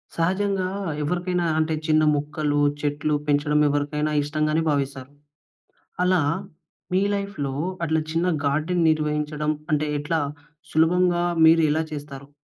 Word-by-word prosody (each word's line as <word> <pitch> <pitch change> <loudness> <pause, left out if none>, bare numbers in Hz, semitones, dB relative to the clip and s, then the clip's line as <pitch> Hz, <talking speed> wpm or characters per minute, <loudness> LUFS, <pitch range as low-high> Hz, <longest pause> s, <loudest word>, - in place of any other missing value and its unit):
సహజంగా 190 +2 0 0.4
ఎవరికైనా 180 +2 -1
అంటే 160 0 +1
చిన్న 155 0 +4
ముక్కలు, 150 0 -1 0.2
చెట్లు 150 +1 0
పెంచడం 150 +1 +2
ఎవరికైనా 150 +1 -1
ఇష్టంగానే 155 +2 0
భావిస్తారు. 140 -2 -2 0.9
అలా 180 -1 +3 0.7
మీ 185 - +3
లైఫ్‌లో 200 -9 -3 0.3
అట్లా 160 0 +1
చిన్న 165 +2 0 0.2
గార్డెన్ 155 +5 +1
నిర్వహించడం 150 0 -1 0.2
అంటే 150 0 +1
ఎట్లా 160 +3 -1 0.5
సులభంగా 175 +2 +3 0.2
మీరు 165 +1 +6
ఎలా 155 +2 +1
చేస్తారు? 140 -2 -8
155 Hz, 110 wpm, -24 LUFS, 145-170 Hz, 0.9 s, మీరు